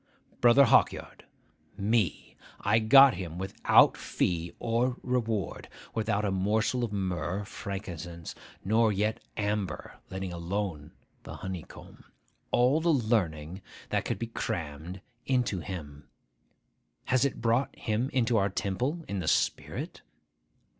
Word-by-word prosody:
Brother 120 +4 +7
Hawkyard. 115 - +2 0.5
Me. 105 -5 0 0.2
I 105 +3 +3
got 135 +4 +8
him 85 -2 -6
without 95 +1 +4
fee 85 -1 -1
or 120 +2 0
reward,—without 110 -2 -2
a 100 - 0
morsel 110 +6 +1
of 115 - -2
myrrh, 90 -2 -2
or - - -8
frankincense, 85 -5 -6 0.3
nor 110 +2 +3
yet 105 +2 0 0.2
amber, 105 -5 -3
letting 95 -1 -5
alone 85 -3 -3 0.3
the - - -9
honeycomb,—all 120 - -3
the 170 - +1
learning 95 - 0 0.3
that - - 0
could - - -1
be 115 - -3
crammed 85 -4 -5 0.3
into 125 -7 +1
him. 75 -4 -8 1.0
Has 130 -1 +2
it 140 - -1
brought 115 +4 +1
him 115 +4 -1
into 120 -2 +1
our 100 -1 +2
temple, 125 - -2
in 100 - -3
the 85 - -4
spirit? - - -1
100 Hz, 120 wpm, -29 LUFS, 90-115 Hz, 1.0 s, got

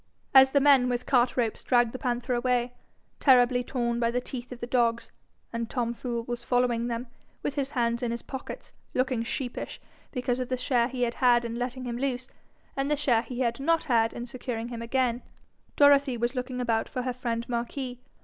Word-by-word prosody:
As 265 0 +9
the 280 - +3
men 270 -3 +5
with 245 0 -2
cart 250 -2 +2
ropes 230 -3 0
dragged 240 -2 +3
the 255 - -6
panther 245 +1 -1
away, 245 0 +1 0.5
terribly 250 -2 +5
torn 235 -2 -1
by 230 -1 +2
the 245 +1 0
teeth 250 0 -7
of 250 - -7
the - - -4
dogs, 235 -2 +1 0.4
and 230 -1 -3
Tom 235 -2 -1
Fool 235 -1 -3
was 240 0 -5
following 245 -1 +1
them, 235 +1 -3 0.4
with - - -1
his 275 -2 -2
hands 235 -3 0
in 245 - -1
his 235 0 -4
pockets, 265 -1 -8 0.2
looking 255 -2 +1
sheepish 245 +1 -4 0.3
because 250 -1 -1
of 255 - -3
the 255 - 0
share 245 -1 +2
he 255 -1 -2
had 235 -1 0
had 240 -2 +3
in 230 - -4
letting 250 +2 -3
him 240 -1 -3
loose, 255 -2 -2 0.5
and 275 +1 -1
the 300 - +3
share 270 -6 +2
he 245 +2 -5
had 235 -1 0
not 330 +3 +2
had 230 -6 +2
in 240 - -6
securing 240 -2 -5
him 235 -1 -6
again, 245 0 0 0.5
Dorothy 280 -3 +5
was 240 +2 0
looking 250 -1 -4
about 230 -2 0
for 250 - -3
her 255 0 -2
friend 235 -2 -3
Marquis. 245 +1 -3
245 Hz, 205 wpm, -28 LUFS, 235-255 Hz, 0.5 s, As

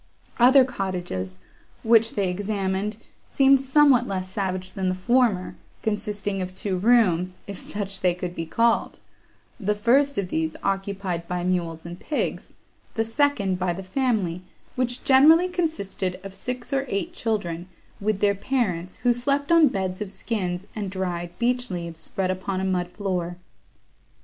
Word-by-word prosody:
Other 255 +2 +7
cottages, 180 - -4 0.4
which 225 0 +4
they 200 -2 +1
examined, 200 +2 -2 0.3
seemed 275 -1 +5
somewhat 270 -2 +4
less 185 -1 -3
savage 185 -2 -2
than 190 -1 -1
the 185 - 0
former, 220 -1 +1 0.3
consisting 205 -2 -2
of 185 0 -5
two 190 -1 -1
rooms, 185 -5 +3
if 200 -2 -7
such 200 -1 -4
they 180 -2 +3
could 180 0 -5
be 165 -2 -4
called; 230 +6 +1 0.6
the 210 -1 0
first 265 +7 +3
of 195 -2 -1
these 160 -1 -1
occupied 195 -3 -2
by 180 0 -2
mules 170 -3 -1
and 175 +1 -7
pigs, 300 - -3 0.4
the 225 -1 +1
second 225 -7 +1
by 180 -1 0
the 190 +3 -7
family, 190 -5 0 0.3
which 250 -1 -1
generally 310 +7 +6
consisted 255 - -2
of 195 -1 -8
six 250 +5 -5
or 270 0 +1
eight 265 - -2
children, 185 - -2 0.3
with 205 -1 -1
their 205 -1 +4
parents, 190 -6 -2
who 245 -1 +5
slept 280 +5 0
on 335 -2 +7
beds 190 -4 -2
of 210 - -3
skins 190 -2 -3
and 205 -3 -3
dried 180 -2 -3
beech 245 +1 +1
leaves, 170 -3 -5
spread 185 +1 -2
upon 185 0 -3
a - - -2
mud 180 -2 0
floor. 180 -3 -3
195 Hz, 155 wpm, -24 LUFS, 185-240 Hz, 0.6 s, Other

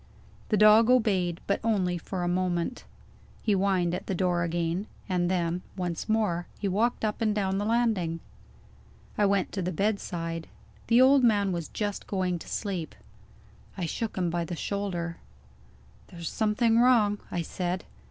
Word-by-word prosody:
The 215 - +2
dog 215 +2 +7
obeyed, 195 -9 +2
but 200 - 0
only 185 -6 +1
for 180 +2 -4
a - - 0
moment. 180 +4 -1 0.6
He 215 - +1
whined 190 -3 +2
at 180 - -4
the 190 - -1
door 175 -1 +1
again 170 +3 -1 0.2
and 180 -2 0
then, 175 -1 0 0.2
once 175 +1 -3
more, 210 -6 +1
he 205 - -2
walked 220 +4 +1
up 215 +2 -2
and 215 -2 +1
down 195 -2 0
the 205 - -1
landing. 215 -8 +1 1.0
I 205 - +3
went 195 -2 +1
to 195 - -3
the 180 +1 -2
bedside. 165 -4 -2 0.4
The 235 +1 +5
old 265 +1 +6
man 205 -4 +3
was 170 -3 -3
just 205 -2 -4
going 185 -3 -1
to - - -11
sleep. 185 -6 -3 0.8
I 180 - -2
shook 215 +7 -3
him 175 -2 0
by 170 0 -1
the 175 +1 -5
shoulder. 175 -3 -3 0.9
"There's 170 -2 -6
something 225 +1 +2
wrong," 225 -5 +4
I 175 - -2
said. 180 +2 -3
190 Hz, 160 wpm, -28 LUFS, 175-215 Hz, 1.0 s, dog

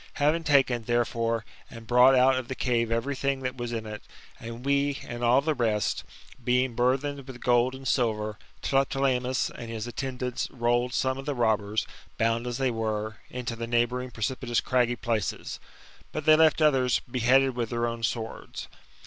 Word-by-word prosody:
Having 155 +3 +1
taken, 130 -6 +3
therefore, 115 -1 0 0.2
and 115 -1 -11
brought 125 +3 +6
out 130 +1 +5
of 130 -2 -3
the 130 - -4
cave 120 -3 0
every 115 +5 -1
thing 135 0 -1
that 130 0 -3
was 120 -1 -4
in 115 -2 -3
it, 105 -1 -7 0.4
and 115 +2 -8
we, 140 0 +1
and 120 0 -5
all 120 +3 +5
the 155 +2 0
rest, 110 -6 0 0.4
being 125 +1 +2
burthened 135 +3 0
with 130 -2 -9
gold 125 +1 +2
and 135 0 -7
silver, 110 -4 0 0.2
Tlepolemus 135 -2 +1
and 115 - -8
his 110 -1 -4
attendAits 125 0 -3
rolled 120 0 0
some 130 0 0
of 135 - -8
the 145 - -1
robbers, 110 -3 +1 0.3
bound 115 +1 +1
as 120 -1 -3
they 135 -2 +1
were, 110 -1 -3
into 125 -2 -4
the 115 0 -5
neighbouring 120 +2 0
precipitous 120 +1 -1
craggy 125 -1 +1
places; 110 -5 -3 0.5
but 155 - -4
they 155 -1 +8
left 160 0 +4
others 130 -4 +3
beheaded 130 +2 +2
with 120 -2 -2
their 120 0 -1
own 115 0 -3
swords. 115 -1 -4
125 Hz, 175 wpm, -27 LUFS, 115-130 Hz, 0.5 s, they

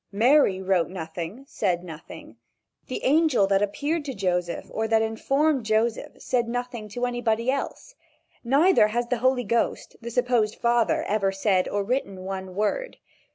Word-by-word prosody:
Mary 225 -1 +4
wrote 185 -3 +1
nothing, 175 +7 -6
said 180 -8 -1
nothing. 155 -9 -11 0.5
The 255 - -5
angel 290 -6 +3
that 195 0 +2
appeared 290 +10 -1
to 270 -3 -5
Joseph 180 -3 -1
or 220 0 -1
that 225 0 +3
informed 270 +5 +1
Joseph 220 +1 0
said 240 -2 0
nothing 240 -2 -4
to 245 +4 -2
anybody 240 0 0
else. 280 - -5 0.5
Neither 280 - +4
has 240 +3 -1
the 250 - 0
Holy 255 0 +2
Ghost, 230 +2 -1
the 235 - -6
supposed 240 -3 +1
father, 235 -1 +1
ever 200 -2 0
said 195 -1 +1
or 205 0 -1
written 200 -4 -2
one 190 -1 -5
word. 350 - -1
225 Hz, 155 wpm, -25 LUFS, 195-250 Hz, 0.5 s, Mary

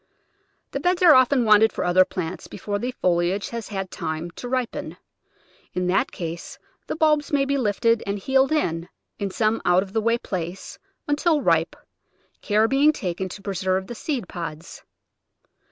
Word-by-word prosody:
The - - -3
beds 360 0 +1
are 335 -3 +9
often 255 -1 +4
wanted 215 +1 +6
for - - -3
other 180 +1 +5
plants 180 -1 -5
before 205 -1 -4
the 245 - -2
foliage 180 +2 +1
has 230 -2 -5
had 195 -3 -5
time 160 +1 -4
to 245 - -8
ripen. 255 -2 -3 0.8
In 180 - 0
that 180 +1 +1
case 170 -1 -6 0.3
the - - -3
bulbs 305 -2 +2
may 280 -2 +2
be 280 +1 0
lifted 230 -2 +1
and 200 +1 -1
heeled 265 +6 +2
in, 170 - -1 0.3
in 200 - -2
some 215 +3 0
out 180 +1 +4
of 195 0 -13
the 220 - +1
way 230 +2 +2
place, 180 -4 -6 0.3
until 295 +1 +1
ripe, - - +2 0.7
care 215 +1 +2
being 275 +4 +4
taken 190 - -4
to 200 +2 -10
preserve 190 -1 -1
die 240 - -7
seed 240 - -3
pods. 165 -2 -7
205 Hz, 170 wpm, -23 LUFS, 180-260 Hz, 0.8 s, are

